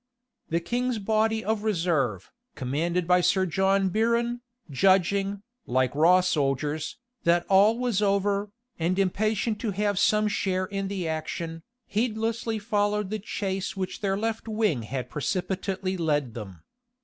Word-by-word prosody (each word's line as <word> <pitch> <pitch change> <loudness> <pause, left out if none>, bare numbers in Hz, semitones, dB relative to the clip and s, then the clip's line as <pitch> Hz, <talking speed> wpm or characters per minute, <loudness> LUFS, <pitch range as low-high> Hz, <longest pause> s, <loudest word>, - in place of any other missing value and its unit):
The 165 - +1
king's 245 +7 -1
body 220 +1 +1
of 220 -1 0
reserve, 165 - 0 0.2
commanded 165 +7 -1
by 180 0 +5
Sir 190 +1 +3
John 190 +2 +2
Biron, 235 +4 +1 0.3
judging, 195 +5 +2 0.2
like 130 0 +1
raw 170 +5 +5
soldiers, 150 -2 -1 0.2
that 170 +1 +2
all 200 +4 +5
was 240 -5 0
over, 200 0 +1 0.3
and 175 +3 0
impatient 210 +3 0
to 225 - -2
have 205 0 0
some 215 0 +3
share 185 -2 0
in 195 0 -3
the 190 -3 -3
action, 160 +1 -4 0.2
heedlessly 225 0 -1
followed 205 -1 0
the 215 - -2
chase 195 0 -3
which 185 -1 -4
their 195 -1 0
left 225 +1 -2
wing 215 - +1
had 125 +3 -4
precipitately 190 +4 -2
led 145 -7 0
them. 95 -8 -9
195 Hz, 135 wpm, -26 LUFS, 170-215 Hz, 0.3 s, by